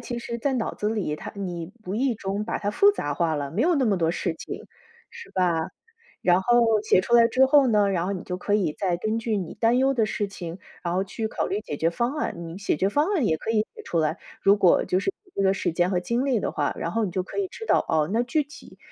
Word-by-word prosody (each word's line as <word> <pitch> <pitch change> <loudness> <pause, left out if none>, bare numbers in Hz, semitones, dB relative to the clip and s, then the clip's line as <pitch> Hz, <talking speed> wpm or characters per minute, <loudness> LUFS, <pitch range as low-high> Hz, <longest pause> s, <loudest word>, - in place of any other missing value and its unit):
其 240 -2 -5
实 235 0 -5
在 270 +3 0
脑 235 -3 -1
子 210 - -2
里， 210 -9 -1
它 - - -7
你 175 -4 -5
无 185 - -4
意 245 +2 +1
中 200 0 -3
把 - - -2
它 205 - -1
复 400 - +5
杂 145 - -3
化 160 +2 0
了， 145 -2 -3
没 190 - -2
有 345 +6 +3
那 280 -4 +2
么 205 -5 +2
多 165 -1 +2
事 175 -1 -2
情， - - -8 0.5
是 470 0 -11
吧？ 170 -3 +1 0.5
然 180 0 +4
后 240 +5 +3 0.2
写 215 - +4
出 235 - 0
来 235 -1 +7
之 260 +3 +4
后 275 +1 +5
呢， 210 -4 +3
然 180 -2 0
后 200 - -1
你 185 -2 -5
就 180 0 -4
可 205 +2 0
以 185 -7 +1
再 185 -3 0
根 215 +5 -1
据 225 -1 -1
你 180 -5 -4
担 230 +1 +2
忧 270 +1 +3
的 225 -4 +1
事 210 -1 -2
情， 180 -3 -7 0.2
然 170 -1 -2
后 190 +1 +1
去 220 +3 -4
考 - - -2
虑 205 +2 -2
解 150 - -6
决 165 +3 +1
方 235 +10 -1
案。 300 - -2
你 170 0 -7
解 200 -4 0
决 190 +6 +1
方 295 +9 +2
案 300 - +2
也 160 - +2
可 220 - -4
以 220 -1 +3
写 - - -10
出 170 - -1
来， 155 -1 0 0.2
如 200 +1 +5
果 185 -3 +4
就 180 - +1
是 290 - -1
有 375 - -25
这 195 - +1
个 195 0 +3
时 - - -1
间 175 +2 +1
和 180 -2 +1
精 235 +7 -1
力 260 -6 +1
的 - - -2
话， - - -1
然 170 - -3
后 225 +5 0
你 195 - -2
就 185 0 -1
可 185 - -8
以 400 - +1
知 450 +4 -9
道， - - +3
哦， 155 0 +1
那 230 +2 +2
具 300 +5 +1
体 290 +2 -14
205 Hz, 300 characters per minute, -25 LUFS, 180-235 Hz, 0.5 s, 来